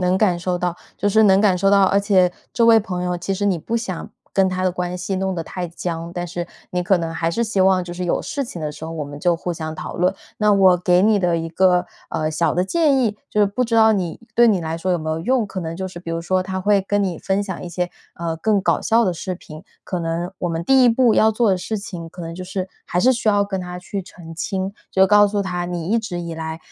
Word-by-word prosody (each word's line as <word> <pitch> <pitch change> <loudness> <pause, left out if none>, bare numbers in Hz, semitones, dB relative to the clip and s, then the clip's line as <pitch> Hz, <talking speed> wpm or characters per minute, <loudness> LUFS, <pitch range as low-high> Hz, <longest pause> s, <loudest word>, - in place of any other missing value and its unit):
能 180 0 +2
感 190 -4 +2
受 180 +1 -1
到， 175 -1 -1 0.2
就 205 - -2
是 220 +2 +4
能 190 -1 +6
感 200 -3 +4
受 195 +2 +3
到。 200 0 +5
而 195 +1 +4
且 190 -3 +3 0.2
这 235 - +3
位 225 -1 +7
朋 180 -4 -4
友， 180 0 -1
其 195 +3 -2
实 200 +2 -2
你 195 -4 +2
不 230 +8 -3
想 195 -7 -5 0.2
跟 190 -1 +3
他 185 0 -2
的 185 - +2
关 180 0 -3
系 185 +2 -3
弄 190 0 -1
得 165 -2 -4
太 175 +1 -5
僵， 165 0 -5
但 175 0 -3
是， 175 0 -4 0.2
你 180 0 -1
可 190 +2 +3
能 165 -1 -3
还 165 +1 -1
是 235 +7 0
希 215 -3 -1
望 185 -1 +4
就 175 - -7
是 180 0 -4
有 - - 0
事 285 - -3
情 230 -9 -7
的 150 -1 -3
时 160 - -8
候， - - -6
我 155 -2 -4
们 145 0 -9
就 175 +1 +2
互 175 +1 -3
相 160 -1 -5
讨 - - -7
论。 180 +2 +2 0.2
那 210 -1 +3
我 190 -2 +5
给 180 0 +3
你 210 0 +4
的 175 -2 +1
一 165 0 -3
个， 180 +1 +3 0.2
呃， 155 0 -1
小 155 - 0
的 180 +2 +1
建 300 - +2
议， 215 -4 0
就 - - -2
是 205 - +5
不 205 +6 -1
知 230 -1 -2
道 220 -1 +6
你 180 -5 -2 0.2
对 240 0 +6
你 200 -5 +2
来 160 0 -3
说 185 +2 -2
有 175 - +2
没 155 0 -4
有 160 +1 -2
用。 245 +5 +1
可 190 - -5
能 165 -1 -5
就 190 +1 -3
是 180 -2 -9
比 170 - -7
如 165 0 -2
说， 185 +2 +1
他 190 0 -4
会 205 +1 +3
跟 205 +1 0
你 180 -3 -2
分 195 +1 -1
享 190 -3 -6
一 180 - -6
些， 180 0 -2 0.2
呃， 165 -1 -3
更 205 +4 +1
搞 - - +2
笑 230 +1 +3
的 185 - +1
视 180 +2 -4
频。 155 -1 -12 0.2
可 180 - -3
能 170 +2 -3
我 175 - -2
们 165 0 -3
第 265 +6 +5
1 245 - +6
步 235 -1 +4
要 220 - +5
做 220 0 +2
的 190 - +2
事 215 +4 -3
情， 185 -6 -7
可 180 +2 -12
能 165 0 -6
就 185 - -7
是 185 0 -4 0.2
还 175 - -1
是 255 +8 +5
需 230 -2 -1
要 205 -1 +3
跟 195 -2 -3
他 180 0 -6
去 195 +2 -5
澄 165 -2 -12
清， 190 +3 -3 0.2
就 190 0 +4
告 205 +1 +6
诉 205 0 -1
他 180 -2 -3
你 175 0 -4
一 230 - +3
直 185 -6 -5
以 170 -1 -5
来， 160 0 -5
185 Hz, 305 characters per minute, -21 LUFS, 175-205 Hz, 0.2 s, 位